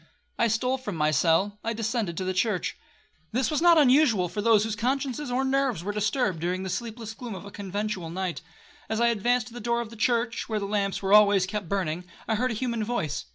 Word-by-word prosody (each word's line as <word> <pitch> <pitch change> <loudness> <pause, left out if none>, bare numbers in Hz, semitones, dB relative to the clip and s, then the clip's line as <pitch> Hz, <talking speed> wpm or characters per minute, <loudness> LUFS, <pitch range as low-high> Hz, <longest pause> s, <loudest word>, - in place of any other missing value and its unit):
I 235 - +4
stole 250 +4 0
from 210 -8 -5
my 155 -1 +2
cell, 175 +7 +2
I 230 - -1
descended 220 -6 -2
to - - -2
the 185 0 -1
church. 190 0 0 0.6
This 255 +5 +1
was 305 - 0
not 340 -1 +6
unusual 255 - +4
for 205 - -3
those 220 -1 +4
whose 220 -1 -2
consciences 265 +3 -1
or 255 +2 0
nerves 265 -9 0
were 205 - -2
disturbed, 210 - 0
during 180 +3 -2
the 190 - -4
sleepless 225 +1 -5
gloom 230 -2 -7
of 185 - -9
a 200 - -9
conventual 200 -3 -4
night. 180 -2 -3 0.5
As 220 0 -1
I 235 0 +4
advanced 240 +2 +1
to - - -16
the 240 - -7
door 235 +1 0
of 235 -2 -5
the - - -10
church, 235 +1 0
where 215 -1 0
the 200 - -3
lamps 200 -1 -1
were 195 +1 +2
always 205 -3 +6
kept 200 -3 -5
burning, 180 -3 -2 0.2
I - - +1
heard 250 +4 +1
a 225 - -2
human 235 -1 -2
voice. 155 - -2
215 Hz, 230 wpm, -26 LUFS, 190-240 Hz, 0.6 s, not